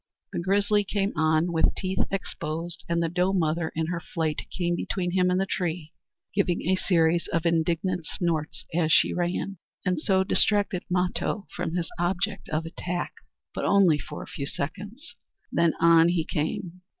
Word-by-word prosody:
The - - -1
grizzly 205 +3 +2
came 200 0 -1
on 160 +2 +2
with 165 -1 +2
teeth 185 0 0
exposed, 170 -2 -4
and 170 0 +1
the - - +1
doe 180 +3 +1
mother 165 -2 +1
in 160 0 0
her 170 +1 -2
flight 160 -2 -3
came 175 -1 -1
between 180 0 -2
him 180 0 +3
and 180 +1 +2
the 195 - +1
tree, 170 -4 -3 0.4
giving 190 -3 +1
a 185 +2 +3
series 170 -2 +2
of 165 0 -1
indignant 170 +1 +1
snorts 165 -5 -2
as 160 -1 +2
she - - +5
ran, 180 +1 -2 0.3
and 180 -3 +1
so 190 +3 +2
distracted 200 -1 +2
Mato 180 +2 0
from 170 -1 -2
his 170 -2 -2
object 190 +3 -1
of 155 +1 -1
attack; 175 +2 -4 0.4
but - - -3
only 185 -7 +4
for - - -7
a - - -12
few 140 - -5
seconds 205 - -6 0.4
then 170 -1 +3
on 165 0 +6
he 170 -2 +1
came! 170 +4 -3
175 Hz, 170 wpm, -26 LUFS, 165-190 Hz, 0.4 s, on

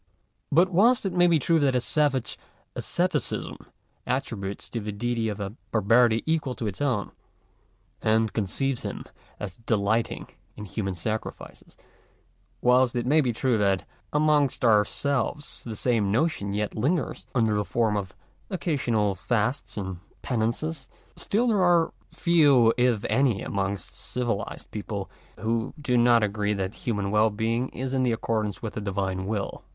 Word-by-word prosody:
But, 175 +5 +4
whilst 230 +7 +4
it 190 - -1
may 175 0 +5
be 170 -2 +4
true 165 +3 +2
that 135 -3 +2
a - - +4
savage 135 -1 0 0.4
asceticism - - -1 0.5
attributes 110 -7 -3
to 115 - -2
the 105 -1 -4
Deity 115 +1 -1
a 105 - -3 0.3
barbarity 115 +2 +3
equal 155 -5 0
to 115 - -4
its 100 +2 -4
own, 125 -8 0 0.9
and 110 0 +2
conceives 120 +5 -1
him - - -5 0.4
as 95 -3 -6
delighting 110 0 0 0.3
in 105 - -6
human 95 -2 -3
sacrifices; 110 +6 -6 0.8
whilst 125 0 +4
it 120 -1 -1
may 150 +5 +4
be 125 -4 +1
true 120 0 +1
that 100 -2 +1 0.2
amongst 150 -4 +2
our 105 -2 +5
selves 140 +1 -2
the 115 -2 -5
same 110 -4 +1
notion 105 -6 0
yet 105 0 -1
lingers, 145 +8 -1
under 110 -3 +3
the 105 0 +1
form 110 0 0
of 95 -2 -4 0.3
occasional 125 - 0
fasts 110 +7 -1
and 95 -3 -4 0.2
penances; 125 +4 -2 0.3
still 225 +5 0
there 210 -4 +3
are 175 -2 +3 0.2
few 145 -9 +4
if 120 -4 +2
any 130 -7 +2
amongst 100 0 -2
civi 120 -5 -2
lized - - -11
people - - -5 0.3
who 115 0 -1
do 130 -4 0
not 120 -1 +5
agree 105 0 0
that 95 +1 -3
human 105 -5 -2
well 105 +1 +4
being 115 +4 -1
is 130 +1 -4
in 130 -1 +2
accordance 110 -4 -2
with 110 - -4
the - - -4
Divine 95 -2 -2
will. 105 -2 -3
115 Hz, 150 wpm, -26 LUFS, 105-135 Hz, 0.9 s, may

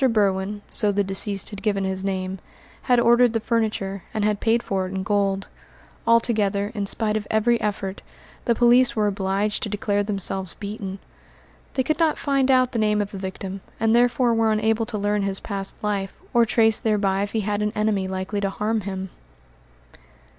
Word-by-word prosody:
Berwin 205 -1 0
so 210 -2 +2
the 205 0 +1
deceased 195 +1 -1
had 205 - -7
given 200 -3 0
his 190 0 -2
name 190 -1 -2 0.4
had 245 -2 +3
ordered 240 0 +5
the 225 - +1
furniture, 215 -4 -1
and 215 -1 +1
had 210 -1 +1
paid 230 +1 +2
for 190 -1 -1
it - - -7
in 190 - -2
gold. 195 -1 0 0.6
Altogether, 215 -3 +2
in 205 -3 -3
spite 215 +1 +1
of 215 -1 -2
every 230 +2 +2
effort, 200 -2 -3 0.4
the 235 - +2
police 245 +2 +4
were 215 -1 +2
obliged 200 +1 0
to 215 - -2
declare 205 0 0
themselves 195 -3 -2
beaten. 200 -2 -6 0.8
They 260 - +2
could 310 +6 -1
not 320 -2 +2
find 275 -2 +1
out 255 -1 +4
the 230 - -1
name 210 -1 +2
of 205 0 -2
the 195 - -6
victim, 190 0 -6 0.2
and 225 +1 +3
therefore 240 0 +3
were 225 -1 +2
unable 220 +1 +1
to 220 -2 -3
learn 205 0 0
his 195 -1 -2
past 195 -2 -4
life, 200 -2 -2 0.2
or 235 -1 +4
trace 225 -1 +3
thereby 200 -3 +1
if 205 0 -3
he 220 - +1
had 205 0 -1
an 210 0 0
enemy 210 -3 0
likely 190 +2 -3
to 200 - 0
harm 215 +3 -1
him. 190 -1 -5
210 Hz, 190 wpm, -23 LUFS, 195-225 Hz, 0.8 s, ordered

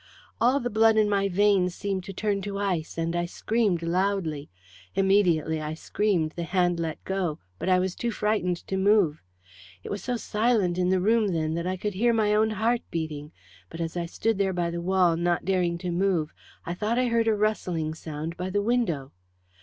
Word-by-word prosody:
"All 250 +4 +4
the 245 -1 -3
blood 220 +1 +4
in 215 -1 +4
my 200 -1 +1
veins 190 -2 +2
seemed 195 -2 -3
to - - -6
turn 200 +1 -1
to 200 0 -4
ice, 180 -6 -2
and 165 +1 -1
I 175 0 0
screamed 205 -2 0
loudly. 170 -4 -1 0.5
Immediately 175 -5 +2
I 155 +1 -4
screamed 175 -2 0
the 170 - -6
hand 175 0 +1
let 160 -2 -4
go, 185 -5 -2 0.2
but - - -2
I 185 - +5
was 185 0 0
too 240 - -3
frightened 210 -5 0
to 190 - -2
move. 190 -6 +3 0.6
It - - -7
was 200 -2 -4
so 245 -1 -1
silent 210 -5 +1
in 180 0 +2
the 190 0 +3
room 220 +3 +3
then, 160 -1 -1
that 170 +2 -2
I 185 0 -1
could 205 +2 -3
hear 235 +5 +2
my 215 -2 +2
own 215 +1 +3
heart 225 +3 0
beating, 155 -3 -4 0.4
but 165 - -9
as 165 0 -3
I 170 -1 -2
stood 220 +4 -1
there 195 -1 +1
by 175 -1 -1
the 170 0 -4
wall 180 -1 +3
not 175 0 0
daring 180 -2 +1
to 175 0 -4
move 175 -3 0 0.3
I 170 - -3
thought 215 +6 -1
I 255 - +3
heard 230 -1 +2
a 220 - +3
rustling 180 -7 -1
sound 160 +1 -6
by 180 +1 -3
the 205 +1 0
window. 200 - 0
185 Hz, 205 wpm, -26 LUFS, 170-210 Hz, 0.6 s, I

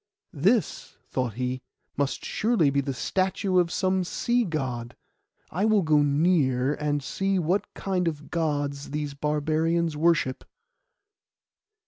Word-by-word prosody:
'This,' 195 - 0
thought 125 -5 -1
he, 125 +1 -2 0.3
'must 140 -1 -2
surely 215 -10 +2
be 140 0 +2
the 140 0 -3
statue 185 - 0
of 175 -1 +1
some 185 0 +1
sea 240 +7 0
God; 125 - -3 0.6
I 185 +5 -1
will 215 -3 +3
go 155 -2 +4
near 145 -3 +2
and 145 -1 -1
see 195 +6 -1
what 180 +3 0
kind 185 -3 -1
of 150 -2 -4
Gods 145 -4 -1
these 150 -1 -3
barbarians 155 +3 0
worship. 155 -4 +1
155 Hz, 125 wpm, -26 LUFS, 140-185 Hz, 0.6 s, go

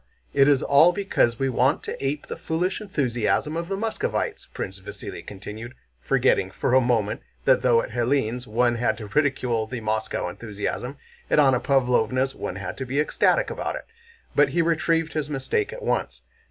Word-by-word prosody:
It 140 - +5
is 140 -3 +4
all 145 +5 +6
because 180 - +1
we 135 - 0
want 130 +2 +2
to - - -5
ape 140 +2 -2
the - - -6
foolish 180 +5 -2
enthusiasm 145 - 0
of 170 +1 -3
those 195 - -1
Muscovites," 225 +2 -2
Prince 95 +1 -5
Vasíli 100 +1 -8
continued, 105 +5 -8 0.3
forgetting - - +2
for - - -1
a 130 - +6
moment 115 -4 0 0.2
that - - +5
though 120 -2 +4
at - - -7
Hélène's 125 0 0
one 120 +2 +2
had 110 -2 +1
to 110 - -7
ridicule 125 -4 +1
the 125 +1 -5
Moscow 110 -3 -2
enthusiasm, 105 +7 -5 0.3
at - - +3
Anna 135 -4 +5
Pávlovna's 130 -1 +2
one 90 - -5
had 90 -2 -5
to 130 - -3
be 135 +3 -1
ecstatic 150 - +2
about - - -3
it. - - -7 0.5
But 145 -1 +5
he 170 +4 +1
retrieved 165 0 +1
his 155 -2 -2
mistake 280 - -1
at - - -8
once. - - -1
130 Hz, 180 wpm, -24 LUFS, 115-150 Hz, 0.5 s, all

